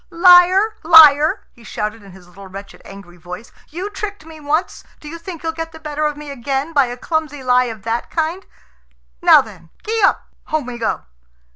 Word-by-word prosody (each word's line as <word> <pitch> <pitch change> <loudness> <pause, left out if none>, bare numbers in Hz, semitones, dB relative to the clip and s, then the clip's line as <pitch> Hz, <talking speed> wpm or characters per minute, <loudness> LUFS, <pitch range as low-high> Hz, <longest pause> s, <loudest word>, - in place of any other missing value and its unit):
"Liar, 360 +4 +5
liar!" 315 +3 +6
he 235 - -20
shouted 215 0 -5
in 200 -1 -15
his 180 -1 -17
little, 195 +2 -14
wretched, 195 +1 -11
angry 195 -3 -13
voice. 180 +6 -10 0.2
"You 370 +6 -6
tricked 405 -4 -7
me 320 -1 -13
once. 305 +4 -2 0.2
Do 300 - -13
you 335 +3 -8
think 335 -1 -9
you'll 325 - -2
get 325 0 -7
the 320 - -12
better 305 -1 -4
of 295 -1 -5
me 295 -1 -9
again 275 +4 -4
by 280 -4 +3
a 245 +1 -7
clumsy 300 -1 -4
lie 250 0 +3
of 225 -4 -8
that 230 +1 -3
kind? 330 +4 -3 0.8
Now - - +7
then. 165 - -14 0.2
Gee 445 +1 -1
up! - - +2 0.2
Home 310 -3 -2
we 240 -1 -8
go." 225 - -2
300 Hz, 195 wpm, -18 LUFS, 230-330 Hz, 0.8 s, Now